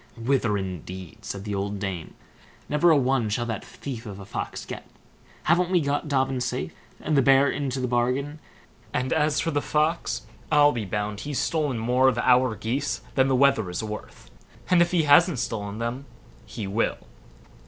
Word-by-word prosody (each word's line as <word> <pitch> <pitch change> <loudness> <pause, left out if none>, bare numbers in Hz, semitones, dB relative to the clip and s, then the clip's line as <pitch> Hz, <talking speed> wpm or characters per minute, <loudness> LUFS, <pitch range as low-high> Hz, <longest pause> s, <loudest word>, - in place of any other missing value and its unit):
"Whither, 115 -3 +1
indeed", 95 -1 -7
said 100 -1 -5
the 105 -1 -4
old 100 +1 -2
dame; 95 -4 -5 0.5
"never 150 +4 +3
a 160 - +6
one 130 -4 +1
shall 120 +3 -1
that 110 -4 -4
thief 125 -4 -7
of 100 -1 -7
a 100 - -9
Fox - - -5
get. - - -8 0.6
Haven't 175 +2 +3
we 180 -1 +3
got 145 0 -1
Dobbin 135 -2 0
safe, 80 -9 -3 0.3
and 155 - -1
the 140 - +5
bear 135 +2 +5
into 135 -2 -2
the 125 - -1
bargain; 125 +5 0 0.6
and 130 0 0
as 150 -1 +2
for 165 - 0
the 145 - 0
Fox, 155 +4 0 0.3
I'll 145 0 +6
be 115 -5 -3
bound 105 +1 -3
he's 145 +1 -4
stolen 150 -6 0
more 125 +4 +3
of 125 - -2
our 125 -1 +3
geese 120 +7 -2
than 130 -1 +3
the 135 - +2
wether 130 -7 +3
is 90 +5 -3
worth; 105 0 -8 0.4
and 180 - +6
even - - +6
if 175 - +4
he 175 -3 +2
hasn't 150 +2 +5
stolen 110 -3 -3
them, 120 +4 -4 0.4
he 110 -1 -5
will. 100 +4 0
125 Hz, 185 wpm, -25 LUFS, 105-145 Hz, 0.6 s, a